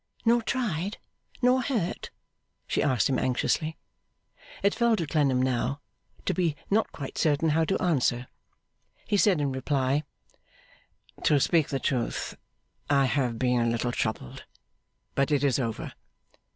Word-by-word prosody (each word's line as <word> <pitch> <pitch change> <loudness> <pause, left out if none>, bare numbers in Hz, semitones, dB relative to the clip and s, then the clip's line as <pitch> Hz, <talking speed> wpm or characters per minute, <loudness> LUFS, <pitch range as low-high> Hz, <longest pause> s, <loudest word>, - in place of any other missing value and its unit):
'Nor 235 +1 +4
tried? 210 -6 -2 0.5
Nor 250 +1 +4
hurt?' 220 -8 -2 0.6
she - - 0
asked 130 -5 +2
him, 130 -2 +1
anxiously. 155 +5 0 0.9
It 200 - +3
fell 235 -1 +3
to 170 - -2
Clennam 145 -4 +2
now, 130 +2 0 0.5
to - - +1
be 170 -5 0 0.2
not 220 +2 +2
quite 135 -3 -6
certain 155 +1 +2
how 160 +2 +2
to 195 - 0
answer. 130 -7 +1 0.8
He - - 0
said 195 -3 +4
in 140 -2 0
reply: 135 +1 0 1.2
'To 145 - +4
speak 160 +2 +3
the 135 - -1
truth, 125 -4 -2 0.5
I 140 -1 +4
have 125 -3 0
been 125 0 +2
a 115 - +2
little 115 +1 0
troubled, 110 - -3 0.7
but 140 +1 +1
it 145 -2 +2
is 140 -1 +2
over. 115 -4 -3
145 Hz, 140 wpm, -27 LUFS, 130-175 Hz, 1.2 s, Nor